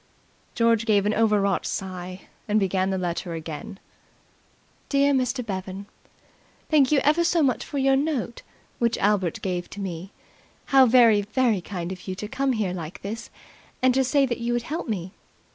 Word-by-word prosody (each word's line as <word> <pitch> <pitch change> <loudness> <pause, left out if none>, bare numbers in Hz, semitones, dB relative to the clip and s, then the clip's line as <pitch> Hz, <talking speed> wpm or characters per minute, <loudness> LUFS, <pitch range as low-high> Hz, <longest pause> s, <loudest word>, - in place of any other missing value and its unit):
George 230 -1 +2
gave 205 -2 +3
an 210 - +2
overwrought 210 -4 +2
sigh 185 -1 -5 0.3
and 210 0 +2
began 190 -1 0
the 190 - -1
letter 175 -1 -3
again. 160 +4 -7 1.1
"DEAR 280 0 +3
MR. 250 -2 0
BEVAN, 190 -1 -5 0.9
"Thank 290 -3 +4
you 300 - +4
ever 305 +4 +3
so 335 -1 +2
much 260 -3 +1
for 285 - -6
your 270 0 +3
note 270 -4 -2 0.4
which 235 -2 +1
Albert 195 -5 0
gave 180 -2 -3
to 205 - -9
me. 185 -1 -5 0.5
How 270 -2 +6
very, 230 -3 +6
very 220 -1 +1
kind 175 -1 -5
of 185 0 -9
you 185 - -3
to 210 +2 -6
come 270 +4 0
here 210 -6 -1
like 165 -2 -7
this 225 +4 -6 0.5
and 255 -1 +5
to 265 +1 +3
say 275 +2 +3
that 245 -2 -3
you 235 0 -1
would 240 -1 -1
help 315 +2 -4
me. 185 -4 -3
215 Hz, 175 wpm, -25 LUFS, 190-255 Hz, 1.1 s, How